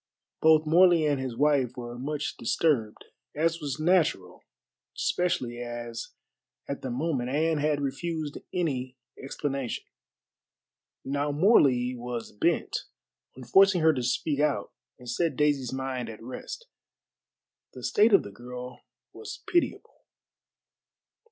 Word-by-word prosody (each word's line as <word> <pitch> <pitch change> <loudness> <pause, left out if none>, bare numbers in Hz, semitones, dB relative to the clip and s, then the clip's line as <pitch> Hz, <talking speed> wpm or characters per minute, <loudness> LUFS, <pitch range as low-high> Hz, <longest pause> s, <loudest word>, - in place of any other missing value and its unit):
Both 160 0 +5
Morley 170 0 +5
and 145 -3 +1
his 130 -3 -4
wife 140 -5 +2
were 120 -1 -6
much 150 +2 -3
disturbed, 115 -4 0 0.3
as 165 +2 0
was 145 -2 -3
natural, 160 - +1 0.6
especially 130 -9 -1
as 120 -1 -5 0.6
at 140 - -4
the 130 - -4
moment 130 -1 -1
Anne 155 +3 +1
had 150 0 +1
refused 150 +2 -3
any 130 -8 -2 0.2
explanation. 135 -2 -4 1.2
Now 140 +2 -1
Morley 140 - +4
was 120 -1 -5
bent 105 - 0 0.6
on 130 - -9
forcing 190 +8 +5
her 160 0 +5
to 130 - -2
speak 140 +4 -1
out 150 -1 0 0.3
and 125 - -14
set 155 +4 0
Daisy's 145 -4 +1
mind 130 -2 -3
at 110 0 -10
rest. 130 - -7 1.1
The - - -9
state 215 +3 +4
of 200 - +6
the 100 - -9
girl 125 +3 -9 0.3
was 435 -1 -9
pitiable. 345 -1 0
140 Hz, 125 wpm, -28 LUFS, 125-160 Hz, 1.2 s, of